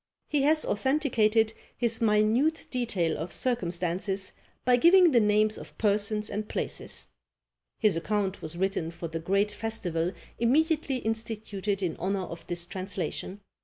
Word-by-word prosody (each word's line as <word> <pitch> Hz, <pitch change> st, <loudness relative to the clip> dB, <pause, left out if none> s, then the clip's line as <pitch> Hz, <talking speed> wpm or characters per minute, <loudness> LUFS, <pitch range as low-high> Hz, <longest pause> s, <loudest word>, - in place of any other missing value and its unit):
He 295 Hz, -, +2 dB
has 310 Hz, +2 st, +3 dB
authenticated 225 Hz, -3 st, +2 dB, 0.2 s
his 235 Hz, -2 st, 0 dB
minute 225 Hz, +8 st, +2 dB
detail 205 Hz, -10 st, 0 dB
of 165 Hz, +3 st, -4 dB
circumstances 185 Hz, -2 st, -1 dB, 0.3 s
by 250 Hz, 0 st, +5 dB
giving 345 Hz, +4 st, +6 dB
the 245 Hz, -, +5 dB
names 215 Hz, 0 st, +2 dB
of -, -, -12 dB
persons 210 Hz, 0 st, +1 dB
and 210 Hz, +1 st, -4 dB
places. -, -, -4 dB, 0.7 s
His 215 Hz, -5 st, +3 dB
account 195 Hz, +3 st, -1 dB
was 160 Hz, +2 st, -2 dB
written 190 Hz, -3 st, -1 dB
for 170 Hz, 0 st, -6 dB
the 165 Hz, 0 st, -4 dB
great 195 Hz, +5 st, +1 dB
festival 185 Hz, -6 st, -1 dB, 0.3 s
immediately 295 Hz, +4 st, +2 dB
instituted 220 Hz, -4 st, -2 dB
in 175 Hz, -, -2 dB
honour 190 Hz, +2 st, -1 dB
of 170 Hz, -2 st, -8 dB
this 175 Hz, -1 st, 0 dB
translation. 190 Hz, +1 st, -4 dB
210 Hz, 135 wpm, -28 LUFS, 185-235 Hz, 0.7 s, giving